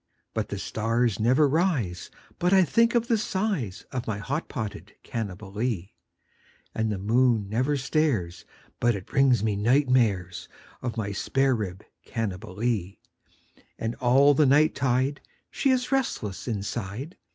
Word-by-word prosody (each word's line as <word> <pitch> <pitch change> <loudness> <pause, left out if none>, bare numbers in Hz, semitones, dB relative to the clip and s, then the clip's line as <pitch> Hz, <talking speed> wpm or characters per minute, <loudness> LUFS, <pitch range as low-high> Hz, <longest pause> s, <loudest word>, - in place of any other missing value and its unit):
But 110 - -2
the 100 - -4
stars 115 +2 0
never 130 +7 +4
rise 140 - 0 0.3
but 180 +2 +2
I 190 -1 +7
think 230 +7 +3
of 235 0 +2
the 230 -3 +2
size 190 - -2
Of 125 -2 -4
my 110 -3 -1
hot 140 +10 -3
potted 110 -6 -6
Cannibalee, 105 -1 -4 0.8
And 110 -1 -1
the 105 - -2
moon 115 +1 +2
never 130 +8 0
stares 130 - 0 0.4
but 120 -1 +2
it 95 -2 -7
brings 130 -5 +3
me 105 -2 +1
night 125 +7 +2
mares 100 -9 +1 0.3
Of 120 -2 -4
my 100 -2 -2
spare 135 +7 +1
rib 95 -3 -5 0.2
Cannibalee; 105 -1 -3 0.8
And 115 +1 -2
all 135 +4 +5
the 145 0 +4
night 150 +3 +4
tide 130 +2 0 0.3
she 275 - 0
is 255 -1 +1
restless 180 - -1
inside. 110 - -4
120 Hz, 140 wpm, -26 LUFS, 105-140 Hz, 0.8 s, I